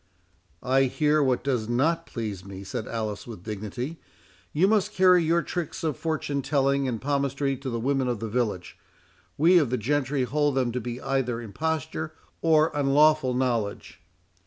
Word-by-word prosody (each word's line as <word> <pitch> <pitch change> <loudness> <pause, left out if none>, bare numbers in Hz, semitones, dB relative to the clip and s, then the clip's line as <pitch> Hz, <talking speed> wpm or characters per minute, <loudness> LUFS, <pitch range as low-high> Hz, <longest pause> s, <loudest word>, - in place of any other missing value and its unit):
"I 135 +1 +3
hear 150 +3 +2
what 130 -3 +1
does 125 -5 -1
not 165 +8 +1
please 105 -6 -5
me," 95 0 -9
said 100 +2 -5
Alice, 110 -2 -4
with 110 -7 -9
dignity; 110 - -5 0.5
"you 170 +6 +3
must 210 -2 +2
carry 180 -2 +5
your 170 +1 +2
tricks 175 -3 -4
of 155 -4 0
fortune 150 -2 -2
telling 140 -1 +1
and 120 -3 -2
palmistry 140 0 0
to 135 +1 -5
the 115 -2 -2
women 135 +2 0
of 120 -3 -1
the 115 - -4
village.—We 120 - -1
of 145 -7 +1
the 125 - 0
gentry 135 +3 0
hold 145 +2 +1
them 125 -3 +1
to 125 +1 -3
be 120 +1 -5
either 130 -4 -1
imposture 155 +6 -3 0.3
or 160 -1 +4
unlawful 145 -1 +3
knowledge." 120 -5 -2
135 Hz, 160 wpm, -26 LUFS, 120-150 Hz, 0.5 s, carry